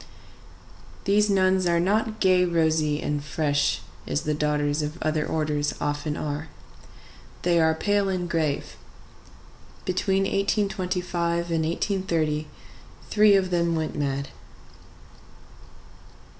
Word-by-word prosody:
These 210 +1 +3
nuns 185 -1 +3
are 170 0 +3
not 215 +4 0
gay, 185 -1 +4
rosy, 160 -3 +1
and 145 -1 -2
fresh, 145 -1 0 0.3
as 75 - -1
the 150 - -1
daughters 150 0 0
of 150 +2 -4
other 155 0 +1
orders 150 -2 -1
often 145 +1 -2
are. 150 +1 -4 1.0
They 170 -1 +3
are 160 -1 +3
pale 205 +3 +1
and 180 -2 -2
grave. 160 -4 -2 1.1
Between 190 +1 +1
1825 180 -4 -1
and 165 -1 +1
1830 165 -3 -1 0.6
three 210 -1 +6
of 185 -2 +1
them 170 -1 +1
went 160 -1 -2
mad. 140 -1 -2
170 Hz, 110 wpm, -25 LUFS, 150-185 Hz, 1.1 s, three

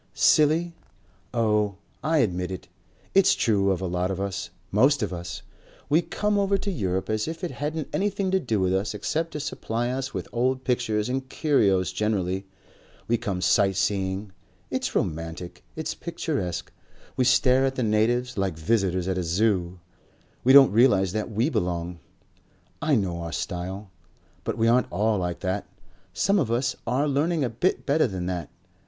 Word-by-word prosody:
"Silly? 160 +3 +4 0.6
Oh! 105 -4 +1 0.3
I 160 +2 +2
admit 90 -2 -3
it. 95 -2 -7 0.5
It's 195 -1 +5
true 100 -4 +2
of 95 -1 0
a - - -2
lot 90 +1 -1
of 95 -1 -3
us. 100 0 -3 0.2
Most 130 +5 +4
of 100 - -2
us. 85 -3 -6 0.5
We 155 +3 +4
come 210 +3 0
over 200 0 +2
to 200 +1 -3
Europe 95 - -1
as 110 +3 -1
if 160 +2 -6
it 180 - -2
hadn't 150 +1 -3
anything 200 -1 0
to 190 - +3
do 115 - -1
with 95 0 +1
us 100 +3 -1
except 160 +11 -1
to 150 - -3
supply 120 -4 -2
us 135 +1 -3
with - - -5
old 130 +2 0
pictures 115 -4 0
and 130 +1 -3
curios 100 - +2
generally. 95 -2 -1 0.6
We 120 - +2
come 95 -4 -3
sight 95 +1 +3
seeing. 95 0 -1 0.4
It's - - -2
romantic. 80 +2 -3
It's 160 - -3
picturesque. 150 - -3 0.4
We 130 - +2
stare 130 +1 +4
at 135 0 -1
the 130 - -1
natives 115 +3 +1
like 95 -4 -1
visitors 95 0 0
at 95 -1 0
a - - -1
Zoo. 90 0 0 0.6
We 130 - +5
don't 135 -1 +9
realize 100 -5 +4
that 110 +3 -2
we 110 +4 +1
belong.... 85 - -2 0.8
I 155 -2 +3
know 90 -6 -1
our 85 0 -5
style.... 95 +4 -4 0.5
But - - -2
we 115 0 +2
aren't 125 +2 +3
all 105 +3 +1
like 90 -1 -3
that. 95 0 -2 0.4
Some 195 - +2
of 135 -10 0
us 120 +2 0
are 130 +5 +1
learning 150 +3 +1
a 125 - 0
bit 175 +11 0
better 150 0 +3
than 95 -4 -4
that. 90 -3 -3
110 Hz, 170 wpm, -25 LUFS, 95-135 Hz, 0.8 s, don't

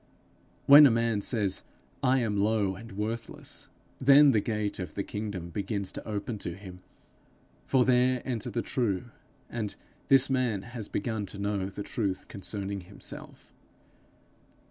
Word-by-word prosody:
When 145 +1 +10
a - - +4
man 115 -2 +1
says, 100 -4 -1 0.4
I 130 0 +3
am 110 -3 0
low 105 -1 +2
and 110 +2 -10
worthless, 110 +3 -5 0.3
then 140 +2 +7
the 110 - +3
gate 105 -2 -2
of 90 - -6
the 100 - -1
kingdom 100 -5 -5
begins 100 +1 -3
to - - -8
open 105 +1 -3
to 85 -3 -4
him, 95 -2 -11 0.9
for 130 -2 +4
there 125 0 +3
enter 120 -5 -3
the 120 - -2
true, 120 -1 -1 0.4
and 110 -4 -4 0.3
this 135 0 +6
man 125 -7 0
has 120 -3 -6
begun 105 -1 -2
to 100 - -8
know 100 -1 -1
the 100 +1 -6
truth 100 -5 -3
concerning 100 -1 -4
himself. 90 +3 -11
105 Hz, 145 wpm, -29 LUFS, 100-120 Hz, 0.9 s, When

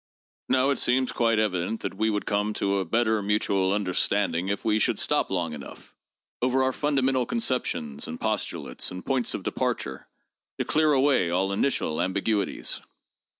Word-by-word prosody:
Now 130 +2 +3
it 140 - -1
seems 130 +1 +2
quite 115 -2 +2
evident 105 0 0
that - - -3
we 110 +3 0
would 105 -1 -1
eome 105 +1 0
to 100 0 0
a 95 - -1
better 110 +3 +1
mutual 100 -2 +1
understanding 95 -2 +1
if 100 +1 -2
we 110 -1 +3
should - - +2
stop - - +1
long 85 -4 -1
enough 70 -3 -10 0.5
over 130 +1 +2
our 130 0 +1
fundamental 135 -3 +1
conceptions 125 - -2
and 80 - -6
pos 110 -2 0
tulates - - -4
and 90 0 -8
points 130 -3 0
of - - -5
departure - - -2 0.5
to - - -1
clear 155 0 +3
away 135 -10 +3
all 95 +3 +1
initial 100 - 0
ambiguities. 100 +2 -1
105 Hz, 165 wpm, -26 LUFS, 95-130 Hz, 0.5 s, Now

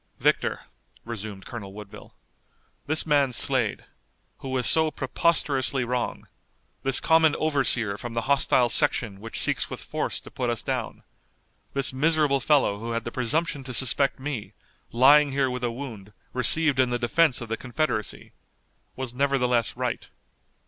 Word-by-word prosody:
"Victor," - - 0 0.4
resumed 105 -4 -7
Colonel 100 -5 -8
Woodville, 105 0 -12 0.7
"this 155 +2 +2
man 145 -4 +2
Slade, - - 0 0.5
who 135 - -7
was 130 -2 -1
so 160 -1 +3
preposterously 135 -2 0
wrong, 120 0 -3 0.5
this 135 -1 +3
common 160 -1 +3
overseer 130 -9 0
from 120 -1 -7
the 115 - -1
hostile 135 -2 +2
section 110 -3 +2
which 115 +2 -7
seeks - - -1
with - - -6
force - - -3
to - - -14
put 125 - -3
us 120 -2 -1
down, - - -4 0.7
this 140 -1 +1
miserable 150 0 +2
fellow 130 -7 +2
who 115 +1 -5
had 115 0 -2
the 120 - -5
presumption 140 +4 -1
to 130 -1 -4
suspect 135 +2 +2
me, 130 -6 -6 0.4
lying 140 +3 +5
here 135 -2 0
with 125 0 -5
a 120 - 0
wound, 115 -6 -9 0.2
received 135 +3 +5
in 130 -1 +3
the 120 - -1
defense 130 +4 +2
of 120 - -7
the 115 - -2
Confederacy, 125 -3 -3 0.6
was 130 -2 -5
nevertheless 125 -4 0
right." 125 -2 -4
130 Hz, 150 wpm, -25 LUFS, 115-140 Hz, 0.7 s, lying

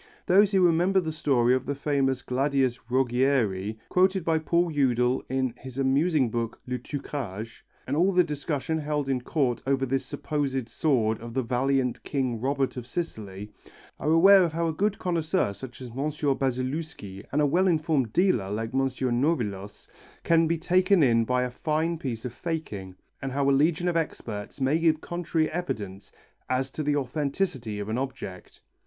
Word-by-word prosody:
Those 200 +3 +5
who 190 -2 +4
remember 175 +3 +3
the 160 -3 -2
story 130 -6 +2
of 130 0 -1
the 140 - -1
famous 135 -2 0
Gladius 130 -1 +1
Rogieri 120 -5 +1
quoted 185 -1 +2
by 160 -1 +2
Paul 170 +2 +1
Eudel 125 -3 +2
in 130 -2 0
his 130 0 -10
amusing 135 -1 +2
book, 115 -1 -3
Le 125 0 -3
Truquage, 115 -5 -6 0.2
and 135 - -2
all 180 +5 +3
the 180 -1 +4
discussion 150 0 -2
held 150 -2 -2
in 130 -2 0
Court 125 -2 0
over 135 -1 +2
this 135 +1 -1
supposed 135 -5 -2
sword 115 -7 +1
of 115 0 -8
the 130 - +1
valiant 130 +1 0
King 130 -5 -2
Robert 135 0 0
of 120 -1 -6
Sicily, 105 - -5 0.5
are 150 - -1
aware 180 +2 +7
how 165 +1 -1
a 160 - -1
good 200 +5 0
connoisseur 170 - 0
such 125 +4 -10
as 125 - -7
M. 135 +6 -2 0.3
Basilewski 130 -6 -3
and 145 - +1
a 150 - +4
well 175 +7 +3
informed 155 -8 +1
dealer 125 - +2
like 110 +3 -3
M. 135 - +2
Nolivos 125 - -1 0.4
can 165 -1 +4
be 165 +1 +1
taken 180 +1 +3
in 115 -3 +4
by 125 +1 +1
a 125 - -3
fine 160 +5 -1
piece 120 -6 -4
of 125 - -4
faking, 115 - -5 0.3
and 135 - -3
how 140 +1 0
a - - +5
legion 155 +5 +2
of 175 - 0
experts 115 -9 -4
may 135 +4 +2
give 160 -2 +3
contrary 165 -2 -1
evidence 105 - -5 0.4
as 130 +1 0
to 155 - -4
the 145 -1 +1
authenticity 140 - -2
of 105 0 -4
an 110 +3 -1
object. 130 -9 -7
135 Hz, 175 wpm, -27 LUFS, 125-160 Hz, 0.5 s, aware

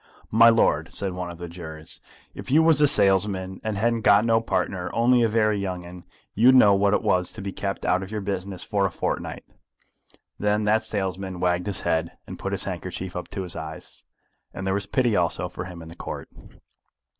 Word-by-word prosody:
"My 115 +1 +7
lord," 80 -9 +2
said 95 -2 -1
one 90 -1 -5
of 85 - -9
the 85 0 -7
jurors, 80 -2 -7 0.3
"if - - -9
you 155 +4 +4
was 160 -3 +4
a 150 - +6
salesman, 95 -5 +5
and 110 -2 -3
hadn't 115 +2 0
got 105 +1 +5
no 115 -1 +3
partner, 95 -5 -2
only 120 +1 +3
a 115 - +3
very 110 -1 +1
young 90 -3 -4
'un, 90 0 -11 0.3
you'd 125 +5 +5
know 105 -6 +7
what 100 +1 +2
it - - -2
was 90 -1 +1
to 110 - -8
be 100 - -4
kept 100 0 -4
out 90 +1 +2
of 95 - -7
your 105 0 -4
business 95 -1 -4
for 100 -2 0
a - - -7
fortnight." - - -4 0.9
Then 105 +1 +1
that 110 +2 +2
salesman 95 -3 -3
wagged 90 0 0
his 100 - 0
head, 80 +1 -1
and 90 -1 -9
put 95 +2 -4
his 100 -1 -1
handkerchief 90 0 -6
up 90 - -5
to 100 -1 -5
his 90 - -6
eyes, 80 +3 -7 0.5
and 95 - -5
there 95 - 0
was 100 0 -2
pity 120 -2 +1
also 90 0 0
for 90 0 -7
him 85 -2 -9
in - - -11
the 85 - -11
Court. - - -7
95 Hz, 215 wpm, -24 LUFS, 90-110 Hz, 0.9 s, My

